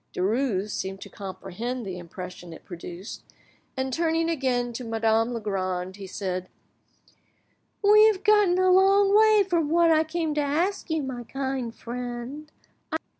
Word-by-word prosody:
Derues 210 Hz, 0 st, 0 dB
seemed 190 Hz, 0 st, -4 dB
to -, -, -9 dB
comprehend 210 Hz, +5 st, -6 dB
the 185 Hz, -2 st, -5 dB
impression 180 Hz, 0 st, -9 dB
it -, -, -13 dB
produced, 175 Hz, +3 st, -8 dB, 0.6 s
and 260 Hz, 0 st, -2 dB
tuning 330 Hz, +1 st, +1 dB
again 250 Hz, -5 st, -1 dB
to 250 Hz, -, -5 dB
Madame 225 Hz, 0 st, +1 dB
Legrand, 190 Hz, -4 st, -3 dB
he 195 Hz, -1 st, -8 dB
said— 185 Hz, -1 st, -4 dB, 1.3 s
"We 425 Hz, +1 st, +7 dB
have 405 Hz, -3 st, 0 dB
got 420 Hz, -2 st, +5 dB
a 370 Hz, 0 st, +3 dB
long 390 Hz, +2 st, +5 dB
way 430 Hz, -1 st, +6 dB
from 335 Hz, -5 st, +1 dB
what 335 Hz, +1 st, +4 dB
I 315 Hz, 0 st, +4 dB
came 320 Hz, -1 st, -2 dB
to 295 Hz, -, 0 dB
ask 335 Hz, +9 st, -1 dB
you, 320 Hz, -2 st, 0 dB
my 255 Hz, -2 st, -5 dB
kind 265 Hz, -2 st, -3 dB
friend. 245 Hz, +5 st, -6 dB
250 Hz, 145 wpm, -26 LUFS, 195-330 Hz, 1.3 s, We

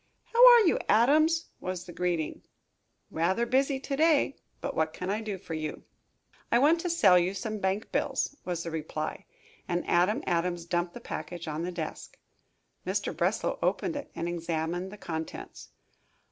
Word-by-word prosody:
"How 475 Hz, +1 st, +6 dB
are 475 Hz, -, +8 dB
you, 365 Hz, -, +3 dB
Adams!" 310 Hz, +9 st, +4 dB
was 180 Hz, -1 st, -4 dB
the 175 Hz, -, -9 dB
greeting. 175 Hz, -3 st, -2 dB, 0.7 s
"Rather 185 Hz, +8 st, +1 dB
busy 270 Hz, +3 st, +1 dB
to 275 Hz, -, -3 dB
day, 305 Hz, -2 st, +3 dB, 0.2 s
but -, -, -4 dB
what 160 Hz, 0 st, 0 dB
can 180 Hz, +1 st, -3 dB
I 210 Hz, +2 st, -1 dB
do 210 Hz, -3 st, -4 dB
for 175 Hz, -, -8 dB
you?" 155 Hz, -1 st, -4 dB, 0.7 s
"I -, -, +5 dB
want 300 Hz, +7 st, +4 dB
to 355 Hz, -, -2 dB
sell 200 Hz, -, +5 dB
you 180 Hz, +3 st, -1 dB
some 215 Hz, +2 st, -4 dB
bank 190 Hz, +2 st, -1 dB
bills," -, -, -1 dB
was 175 Hz, -2 st, -3 dB
the 165 Hz, -, -5 dB
reply, 155 Hz, -1 st, -4 dB, 0.4 s
and 175 Hz, -1 st, -2 dB
Adam 180 Hz, +5 st, +2 dB
Adams 175 Hz, 0 st, -1 dB
dumped 175 Hz, 0 st, -1 dB
the -, -, -8 dB
package 170 Hz, +2 st, -6 dB
on 155 Hz, +1 st, -3 dB
the 175 Hz, +2 st, -3 dB
desk. 165 Hz, -3 st, -6 dB, 0.7 s
Mr. -, -, -2 dB
Breslow -, -, 0 dB
opened 340 Hz, -4 st, 0 dB
it 285 Hz, -, -5 dB
and 170 Hz, -, -3 dB
examined 170 Hz, +2 st, -2 dB
the 210 Hz, -, -10 dB
contents. 160 Hz, -, -6 dB
180 Hz, 170 wpm, -29 LUFS, 170-235 Hz, 0.7 s, are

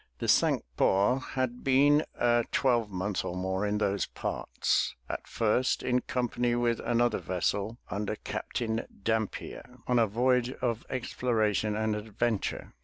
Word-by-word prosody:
The -, -, -3 dB
Cinque -, -, +3 dB
Ports 105 Hz, +7 st, +3 dB
had 130 Hz, -2 st, -1 dB
been 145 Hz, +3 st, +5 dB
a 120 Hz, -1 st, +3 dB
twelvemonth 105 Hz, -7 st, +1 dB
or 90 Hz, -, -4 dB
more 95 Hz, +2 st, -1 dB
in 105 Hz, +1 st, 0 dB
those 100 Hz, -2 st, 0 dB
parts, -, -, -1 dB
at -, -, -5 dB
first 115 Hz, +3 st, +1 dB
in 125 Hz, 0 st, +2 dB
company 120 Hz, -1 st, 0 dB
with 120 Hz, -1 st, +1 dB
another 120 Hz, 0 st, +1 dB
vessel 100 Hz, +5 st, -1 dB
under 105 Hz, +2 st, -2 dB
Captain 115 Hz, +1 st, -3 dB, 0.2 s
Dampier, 110 Hz, +2 st, -3 dB
on 125 Hz, -1 st, +2 dB
a 115 Hz, -, +4 dB
voyage 125 Hz, +3 st, +2 dB
of 115 Hz, -3 st, -2 dB
exploration 110 Hz, -4 st, 0 dB
and 110 Hz, 0 st, 0 dB
adventure. 110 Hz, 0 st, -2 dB
115 Hz, 135 wpm, -29 LUFS, 105-125 Hz, 0.2 s, been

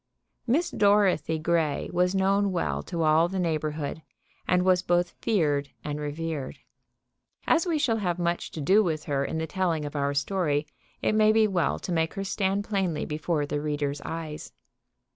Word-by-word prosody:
Miss 310 Hz, +9 st, +1 dB
Dorothy 200 Hz, -6 st, +3 dB
Grey 160 Hz, -2 st, 0 dB
was 180 Hz, +2 st, +2 dB
known 195 Hz, +1 st, +2 dB
well 175 Hz, -, -1 dB
to 170 Hz, -3 st, -3 dB
all 155 Hz, +2 st, +4 dB
the 190 Hz, +2 st, -4 dB
neighborhood, 155 Hz, -3 st, -2 dB, 0.5 s
and 180 Hz, 0 st, +3 dB
was 185 Hz, -1 st, +4 dB
both 175 Hz, -1 st, +1 dB
feared 145 Hz, -9 st, +1 dB
and 150 Hz, 0 st, -4 dB
revered. 150 Hz, -1 st, -4 dB, 0.9 s
As 330 Hz, +2 st, +3 dB
we 330 Hz, -3 st, +1 dB
shall 235 Hz, -6 st, +1 dB
have 180 Hz, -5 st, -1 dB
much 175 Hz, 0 st, -1 dB
to 155 Hz, -, -5 dB
do 195 Hz, +9 st, +4 dB
with 155 Hz, -4 st, -2 dB
her 140 Hz, -2 st, -1 dB
in 160 Hz, -, -3 dB
the 160 Hz, -, -1 dB
telling 165 Hz, -3 st, -1 dB
of 145 Hz, -, -7 dB
our 140 Hz, 0 st, 0 dB
story, 150 Hz, -1 st, 0 dB, 0.4 s
it -, -, +2 dB
may 215 Hz, 0 st, +5 dB
be 220 Hz, 0 st, +4 dB
well 180 Hz, -5 st, 0 dB
to -, -, -6 dB
make 160 Hz, -1 st, 0 dB
her 195 Hz, -, -3 dB
stand 195 Hz, 0 st, 0 dB
plainly 190 Hz, -7 st, -1 dB
before 155 Hz, 0 st, -1 dB
the 145 Hz, 0 st, -3 dB
reader's 145 Hz, -1 st, -2 dB
eyes. 160 Hz, -2 st, -6 dB
170 Hz, 175 wpm, -27 LUFS, 150-195 Hz, 0.9 s, may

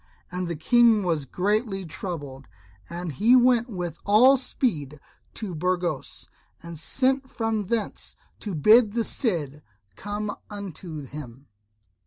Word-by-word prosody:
And 180 Hz, 0 st, -3 dB
the 170 Hz, -, -3 dB
King 230 Hz, +6 st, +4 dB
was 165 Hz, -6 st, 0 dB
greatly 200 Hz, -, -1 dB
troubled. 145 Hz, -6 st, -5 dB, 0.4 s
And 175 Hz, 0 st, -5 dB
he 220 Hz, -, +4 dB
went 245 Hz, -1 st, +4 dB
with 175 Hz, -5 st, -5 dB
all 235 Hz, +7 st, +6 dB
speed 160 Hz, -, -1 dB, 0.4 s
to 205 Hz, -5 st, -5 dB
Burgos, 175 Hz, -2 st, -2 dB, 0.4 s
and 170 Hz, -2 st, -8 dB
sent 265 Hz, -, +1 dB
from 225 Hz, -4 st, -2 dB
thence 230 Hz, 0 st, -2 dB, 0.2 s
to 205 Hz, -5 st, -4 dB
bid 215 Hz, -, +5 dB
the 230 Hz, 0 st, +1 dB
Cid 155 Hz, -, -1 dB, 0.3 s
come 205 Hz, -, -4 dB
unto 175 Hz, -7 st, -7 dB
him. 135 Hz, -1 st, -10 dB
190 Hz, 125 wpm, -25 LUFS, 160-225 Hz, 0.4 s, all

